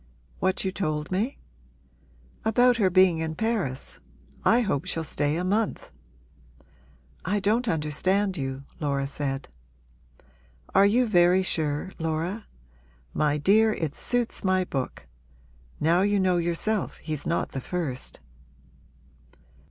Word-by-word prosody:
'What 190 +1 0
you 190 - 0
told 155 -5 -2
me?' 215 +9 -1 1.1
'About 245 +2 +4
her 200 -5 +3
being 185 -2 +4
in 160 -1 -3
Paris. 200 - -2 0.4
I 240 - +4
hope 190 - -1
she'll 165 - -2
stay 145 -1 -1
a 175 - -1
month!' 210 +4 -1 1.3
'I 205 +4 0
don't 225 +5 +1
understand 185 +4 +1
you,' 135 -3 -4 0.2
Laura 140 -3 0
said. 140 -1 -4 1.3
'Are 195 +1 +6
you 245 +5 +3
very 180 -3 +4
sure, 155 0 -1
Laura? 165 +6 -2 0.7
My 150 -1 +1
dear, 215 +8 +4
it 160 -7 -3
suits 245 +5 -1
my 185 -1 +2
book! 135 - -4 0.7
Now 170 +4 +3
you 205 +1 +2
know 185 -2 +2
yourself 175 +5 -1
he's 155 -3 -5
not 170 - -1
the 135 - -4
first.' 140 - -4
180 Hz, 120 wpm, -26 LUFS, 150-205 Hz, 1.3 s, Are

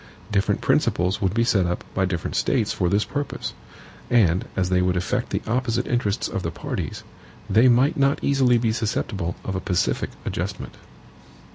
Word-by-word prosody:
Different 100 -1 +1
principles 90 +3 +1
would 95 0 0
be 115 - +3
set 100 -6 +2
up 90 - -2
by 95 - +1
different 90 -3 -3
States - - +1
for 90 - 0
this 100 +2 +2
purpose; 145 0 -4 0.6
and 95 -7 +3
as 90 -1 0
they 90 0 +3
would 90 0 +1
affect 120 +7 -1
the - - -2
opposite 120 +1 0
interests 110 -4 0
of - - -3
the - - -2
parties, - - -5 0.4
they 115 +4 +5
might 125 +3 +4
not 140 0 +3
easily 130 -3 +3
be 115 -1 +1
susceptible 100 -5 -2
of 95 - -3
a 95 - -2
pacific 90 -2 0 0.2
adjustment. 95 +3 -4
105 Hz, 170 wpm, -23 LUFS, 90-120 Hz, 0.6 s, they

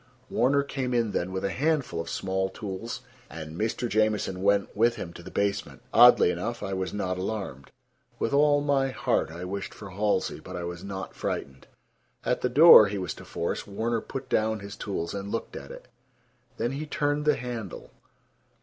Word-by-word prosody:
Warner 140 +3 +3
came 130 -3 -2
in 115 -3 +1
then 90 -1 -2
with 95 +1 -2
a 100 - 0
handful 140 - 0
of 85 - -7
small 95 0 -1
tools, 105 +3 -6 0.3
and 80 0 -8
Mr. 110 +5 -1
Jamieson 110 -4 +1
went 100 0 +2
with 115 +3 +3
him 85 - -6
to 85 - -10
the 90 - -9
basement. 100 +1 -2
Oddly 120 -7 +8
enough, 115 +8 -4
I 95 - -3
was 95 0 -2
not 90 -3 -2
alarmed. 95 -9 -4 0.5
With - - -1
all 145 0 +4
my 140 -2 +2
heart 130 - 0
I 85 +3 -7
wished 100 +2 -5
for 105 -2 -9
Halsey, 105 +2 0
but 90 - -9
I 90 - -4
was 85 0 -6
not 95 -1 -6
frightened. 65 -1 -4 0.6
At - - 0
the 125 - +1
door 145 -5 +9
he 100 +1 -3
was 90 -2 -3
to - - -12
force, 85 - -3
Warner 110 +3 -1
put 135 -1 -6
down 110 -2 +1
his 100 +1 -8
tools 85 -5 -4
and 100 0 -5
looked 115 - -4
at - - -8
it. - - -11 0.7
Then 120 - -1
he 145 +3 -4
turned 145 0 0
the 150 -1 +4
handle. 120 -6 -6
105 Hz, 190 wpm, -27 LUFS, 95-125 Hz, 0.7 s, door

